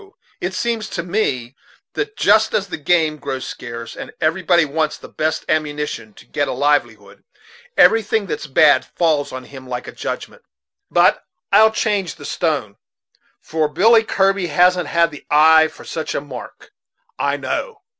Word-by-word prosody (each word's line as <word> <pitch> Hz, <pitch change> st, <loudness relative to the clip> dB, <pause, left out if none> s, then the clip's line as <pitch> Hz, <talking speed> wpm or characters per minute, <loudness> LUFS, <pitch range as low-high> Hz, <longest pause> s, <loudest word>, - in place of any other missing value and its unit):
it 185 Hz, +1 st, -3 dB
seems 230 Hz, -1 st, -2 dB
to 170 Hz, -, -4 dB
me 140 Hz, -, -2 dB, 0.4 s
that 425 Hz, +1 st, -4 dB
just 220 Hz, 0 st, +3 dB
as 200 Hz, -, +1 dB
the -, -, -5 dB
game 155 Hz, 0 st, +1 dB
grows 135 Hz, -2 st, -5 dB
scarce, 115 Hz, -1 st, -7 dB
and -, -, -8 dB
a 165 Hz, +4 st, 0 dB
body 175 Hz, -3 st, +3 dB
wants 155 Hz, +1 st, -1 dB
the -, -, -12 dB
best 155 Hz, +1 st, -2 dB
ammunition 150 Hz, -7 st, -2 dB
to -, -, -17 dB
get 145 Hz, -, -2 dB
a -, -, -2 dB
livelihood, 120 Hz, -8 st, -1 dB, 0.5 s
everything 220 Hz, -1 st, +4 dB
that's 150 Hz, -5 st, -5 dB
bad 145 Hz, +1 st, +5 dB
falls 155 Hz, -4 st, 0 dB
on 130 Hz, 0 st, -7 dB
him 130 Hz, -1 st, -12 dB
like 125 Hz, -1 st, -5 dB
a -, -, -6 dB
judgment. -, -, -6 dB, 0.5 s
But -, -, +3 dB, 0.3 s
I'll 215 Hz, +2 st, +7 dB
change 205 Hz, -4 st, -1 dB
the -, -, -11 dB
stone, 145 Hz, -, -2 dB, 0.6 s
for 155 Hz, -1 st, -1 dB
Billy 215 Hz, -, +4 dB
Kirby 195 Hz, -3 st, +1 dB
hasn't 180 Hz, +3 st, +3 dB, 0.2 s
the 145 Hz, -, -11 dB
eye 160 Hz, +1 st, +6 dB
for -, -, -14 dB
such 160 Hz, -1 st, -4 dB
a -, -, -1 dB
mark, 135 Hz, -4 st, -10 dB, 0.5 s
I 140 Hz, 0 st, 0 dB
know." 420 Hz, -, -4 dB
155 Hz, 160 wpm, -19 LUFS, 140-190 Hz, 0.6 s, I'll